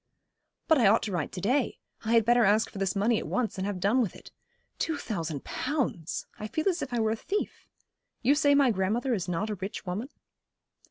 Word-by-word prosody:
'But 320 -4 +5
I 225 - +5
ought 220 +3 +4
to 215 - -3
write 170 -5 -2
to 180 - -5
day. 255 +7 +1 0.3
I 225 - +1
had 230 -2 +5
better 240 +1 +5
ask 215 +2 +3
for 195 - -7
this 195 -1 0
money 215 +3 +2
at - - -6
once, 230 -5 -1
and 190 - -1
have 200 -3 -3
done 205 +8 +3
with 215 - -2
it. - - -13 0.5
Two 320 -2 0
thousand 165 - -4
pounds! 255 - -2
I 215 - -4
feel 315 - -2
as 360 -3 +1
if - - -4
I 240 - 0
were 220 -1 +2
a - - +1
thief. 395 - -4 0.6
You 265 +4 +5
say 290 -1 +4
my 275 -3 +5
grandmother 220 +6 0
is 190 -5 -2
not 195 +5 -1
a - - -2
rich 200 +3 -5
woman?' 200 +9 -3
220 Hz, 225 wpm, -28 LUFS, 195-255 Hz, 0.6 s, But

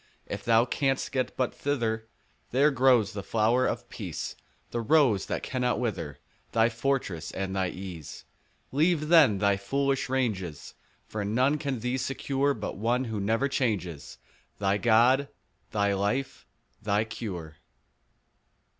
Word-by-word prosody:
If - - -6
thou 115 0 +4
canst 135 +1 0
get 130 -2 -2
but 130 -2 0
thither, 115 -6 -1 0.4
There 140 +4 +4
grows 125 -5 +4
the 100 - -4
flower 115 +5 +2
of - - -3
Peace, - - -5 0.4
The 120 - -1
Rose 115 -5 +3
that - - -3
cannot 125 -3 0
wither, 110 - -2 0.3
15 - - -42
Thy 115 +1 +4
fortress, 115 - -2
and 95 0 -3
thy 95 -2 0
ease. 90 -5 -8 0.5
Leave 155 +2 +2
then 150 - +6
thy 100 0 +2
foolish 135 +6 0
ranges; 105 - -2 0.3
For 105 -1 -4
none 130 +8 +2
can 140 -6 -3
thee 125 +2 -1
secure 135 +2 0
But 105 - -5
One 120 +5 +1
who 110 -4 -3
never 115 +7 +1
changes— 105 - -2 0.4
Thy 100 0 +1
God, 120 +5 +4 0.4
thy 100 -1 +1
life, 105 +8 -2 0.3
thy 105 0 +1
cure. 90 -9 -6
115 Hz, 140 wpm, -28 LUFS, 100-135 Hz, 0.5 s, then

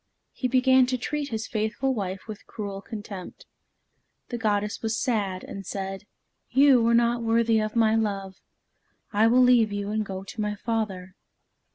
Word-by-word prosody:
He 255 - -2
began 260 0 +4
to 255 0 0
treat 290 +3 -3
his 220 -1 -3
faithful 220 +5 -1
wife 195 -3 -4
with 215 -2 -9
cruel 200 -3 -6
contempt. 205 -4 -8 0.8
The 240 - -3
goddess 210 -1 0
was 225 0 -1
sad, 200 -7 -1
and 195 - -7
said: 195 +1 -5 0.4
"You 265 -3 +5
are 235 - +4
not 235 0 +2
worthy 230 0 +2
of 215 +1 -2
my 220 -1 +4
love. 200 -4 -2 0.7
I 215 +2 +4
will 250 +2 +5
leave 240 -4 +5
you 205 0 -3
and 215 0 0
go 190 -2 -6
to 205 +3 -6
my 210 0 -1
father." 200 -4 -3
220 Hz, 165 wpm, -26 LUFS, 200-235 Hz, 0.8 s, You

